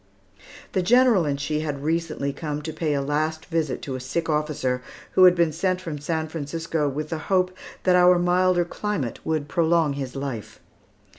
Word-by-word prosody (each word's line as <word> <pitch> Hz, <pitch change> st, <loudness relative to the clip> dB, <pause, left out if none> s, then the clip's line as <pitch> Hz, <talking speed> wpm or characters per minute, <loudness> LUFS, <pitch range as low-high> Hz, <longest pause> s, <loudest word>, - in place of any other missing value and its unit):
The 190 Hz, -, +1 dB
General 235 Hz, -2 st, +4 dB
and 140 Hz, -1 st, -1 dB
she 150 Hz, +2 st, -1 dB
had 145 Hz, -3 st, -4 dB
recently 155 Hz, -3 st, -1 dB
come 150 Hz, -1 st, -4 dB
to 160 Hz, 0 st, -5 dB
pay 155 Hz, -2 st, -1 dB
a 140 Hz, -, 0 dB
last 155 Hz, +3 st, -1 dB
visit 160 Hz, -6 st, -2 dB
to 135 Hz, -, -4 dB
a 130 Hz, -, -3 dB
sick 160 Hz, +6 st, -3 dB
officer, 150 Hz, -4 st, -1 dB, 0.3 s
who 185 Hz, -, +6 dB
had 180 Hz, -1 st, +7 dB
been 170 Hz, -2 st, +2 dB
sent 185 Hz, +4 st, 0 dB
from 165 Hz, -5 st, -5 dB
San 160 Hz, +2 st, -2 dB
Francisco 160 Hz, 0 st, -2 dB
with 150 Hz, +3 st, -4 dB
the 160 Hz, -, -3 dB
hope 185 Hz, -1 st, +2 dB, 0.3 s
that 180 Hz, -1 st, +4 dB
our 180 Hz, 0 st, +6 dB
milder 180 Hz, 0 st, +3 dB
climate 180 Hz, -, -3 dB
would 155 Hz, -2 st, -1 dB
prolong 165 Hz, -2 st, +2 dB
his 135 Hz, -2 st, -5 dB
life. 135 Hz, -6 st, -5 dB
160 Hz, 180 wpm, -24 LUFS, 145-175 Hz, 0.3 s, had